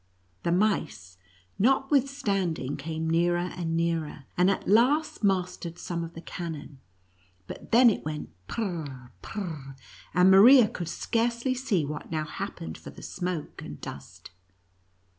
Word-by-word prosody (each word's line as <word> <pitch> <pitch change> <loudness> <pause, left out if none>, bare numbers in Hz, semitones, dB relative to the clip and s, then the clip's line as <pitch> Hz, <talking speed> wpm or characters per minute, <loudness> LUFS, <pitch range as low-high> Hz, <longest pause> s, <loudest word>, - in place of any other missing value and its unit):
The 170 - 0
mice, 165 - 0 0.4
notwithstanding, 245 - +1
came 160 +2 -4
nearer 175 +2 +1
and 165 -2 -2
nearer, 165 -3 -1
and 180 +2 +4
at 195 - -1
last 250 +8 +3
mastered 180 -3 0
some 170 -1 -4
of 165 0 -8
the 165 - -7
cannon, 155 -5 -7 0.7
but - - -10
then 245 +2 +7
it - - -4
went 150 0 -5 0.2
prr 175 - -3 0.2
— - - -34
prr 155 -9 -6
— - - -20
and 180 +2 +6
Maria 230 +5 +9
could 175 -4 -5
scarcely 235 +5 0
see 245 - 0
what 150 +1 -6
now 155 -1 -1
happened 80 - -6
for - - -10
the - - -12
smoke 180 -4 -4
and - - -8
dust. 70 - -10
175 Hz, 140 wpm, -27 LUFS, 160-215 Hz, 0.7 s, Maria